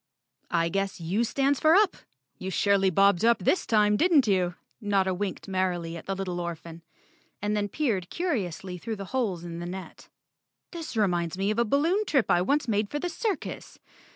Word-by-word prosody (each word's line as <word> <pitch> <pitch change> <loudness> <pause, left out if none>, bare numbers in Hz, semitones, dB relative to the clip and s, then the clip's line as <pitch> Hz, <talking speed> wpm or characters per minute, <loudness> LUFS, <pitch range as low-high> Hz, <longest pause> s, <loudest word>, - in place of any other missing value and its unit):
"I 170 -1 +1
guess 195 +1 -2
U 180 +7 0
stands 275 +3 +1
for 315 +2 +5
Up. 400 -2 +4 0.4
You 190 - -4
surely 195 +1 +3
bobbed 195 +1 +3
up 235 0 +5
this 200 - +1
time, 210 -2 +3
didn't 320 -4 +4
you?" 185 -4 +1 0.3
Notta 195 -3 +1
winked 190 0 -4
merrily 180 -3 -1
at 165 - -9
the 195 - -1
little 185 -2 -3
orphan, 170 -1 -7 0.6
and 210 +1 -1
then 205 -1 -1
peered 205 - -1
curiously 190 - -3
through 225 +5 -4
the 195 -1 -7
holes 205 -10 -1
in 170 -1 -6
the 175 - -5
net. 185 +1 -9 0.6
"This 330 -8 -6
reminds 175 -4 0
me 195 +2 +1
of 215 - -1
a 235 - +3
balloon 320 - +2
trip 270 -7 +2
I 175 - +4
once 280 +7 +1
made 210 -2 0
for 295 - -3
the 355 +4 -2
circus. 390 0 -4
200 Hz, 185 wpm, -27 LUFS, 180-245 Hz, 0.6 s, for